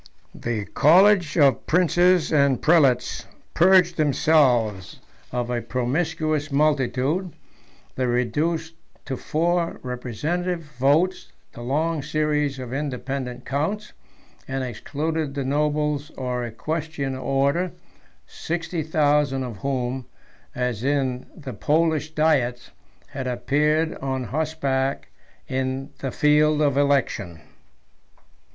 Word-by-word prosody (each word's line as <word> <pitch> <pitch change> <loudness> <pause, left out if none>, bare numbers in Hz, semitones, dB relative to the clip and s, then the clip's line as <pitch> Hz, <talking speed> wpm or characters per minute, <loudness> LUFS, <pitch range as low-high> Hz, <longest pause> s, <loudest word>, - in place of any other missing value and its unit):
II. - - -13 0.2
The - - -10
college 180 - +4
of 140 -4 +3
princes 175 0 +3
and 140 -4 +3
prelates 140 -7 +2 0.3
purged 180 -1 +5
themselves 130 - +2 0.3
of 125 0 -2
a 120 -1 -1
promiscuous 155 +4 -1
multitude: 145 +4 +1 0.6
they 130 -1 -1
reduced 155 +7 -1 0.3
to 135 - -3
four 170 +5 -1
representative 150 +9 -3 0.2
votes 155 +8 +2 0.2
the - - -10
long 155 +5 -1
series 150 -1 0
of 125 -1 -6
independent 135 -2 -4
counts, 195 +10 -2 0.5
and 135 0 -2
excluded 145 +5 -3
the 140 -2 -2
nobles 150 +1 0
or 125 -2 -2
equestrian 145 +3 -4
order, 140 +7 0 0.5
sixty 170 0 -4
thousand 145 -3 +1
of 120 -5 -6
whom, 130 +2 -3 0.5
as 125 -3 -2
in 130 -2 0
the 140 -6 -7
Polish 155 +5 +1
diets, 130 -6 +1 0.4
had 135 -2 -5
appeared 150 +6 +1
on 130 -1 -3
horseback 140 0 -2 0.4
in 130 +2 -3
the 135 - -3
field 150 +2 +3
of 145 -3 +2
election. 135 - 0
145 Hz, 105 wpm, -23 LUFS, 130-160 Hz, 0.6 s, purged